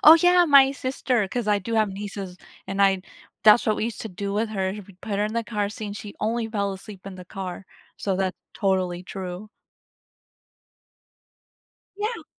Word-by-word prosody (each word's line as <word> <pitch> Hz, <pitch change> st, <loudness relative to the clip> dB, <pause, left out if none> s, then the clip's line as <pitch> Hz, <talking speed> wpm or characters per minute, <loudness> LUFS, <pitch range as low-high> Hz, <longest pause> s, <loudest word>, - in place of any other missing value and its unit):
Oh, 315 Hz, -, +12 dB
yeah, 355 Hz, +1 st, +6 dB
my 280 Hz, -4 st, +7 dB
sister, 255 Hz, -5 st, 0 dB
'cause 235 Hz, 0 st, -2 dB
I 205 Hz, -, +4 dB
do 225 Hz, +4 st, -4 dB
have 215 Hz, -1 st, +3 dB
nieces, 195 Hz, -2 st, -6 dB, 0.3 s
and 195 Hz, +1 st, -2 dB
I'd 190 Hz, -1 st, +3 dB, 0.4 s
that's 215 Hz, +2 st, +7 dB
what 215 Hz, -, +3 dB
we -, -, -1 dB
used 230 Hz, -1 st, -4 dB
to 225 Hz, -, -5 dB
do 200 Hz, +1 st, -4 dB
with 215 Hz, +2 st, 0 dB
her. 190 Hz, -3 st, -1 dB, 0.2 s
We 200 Hz, -, -15 dB
put 210 Hz, -3 st, -3 dB
her 205 Hz, -, +2 dB
in 215 Hz, -, -2 dB
the 230 Hz, 0 st, 0 dB
car 210 Hz, -3 st, -1 dB
seat, 215 Hz, +1 st, -6 dB
and 205 Hz, 0 st, -5 dB
she 210 Hz, -1 st, -8 dB
only 225 Hz, +2 st, 0 dB
fell 200 Hz, -3 st, -1 dB
asleep 190 Hz, 0 st, -10 dB
in 195 Hz, -, -6 dB
the 180 Hz, -, -9 dB
car, 185 Hz, 0 st, -6 dB, 0.3 s
so, 195 Hz, -, -1 dB
that's 190 Hz, -1 st, -1 dB, 0.2 s
totally 185 Hz, -3 st, 0 dB
true. 185 Hz, +1 st, -6 dB, 2.5 s
Yeah. 430 Hz, +3 st, -3 dB
205 Hz, 190 wpm, -25 LUFS, 190-230 Hz, 2.5 s, Oh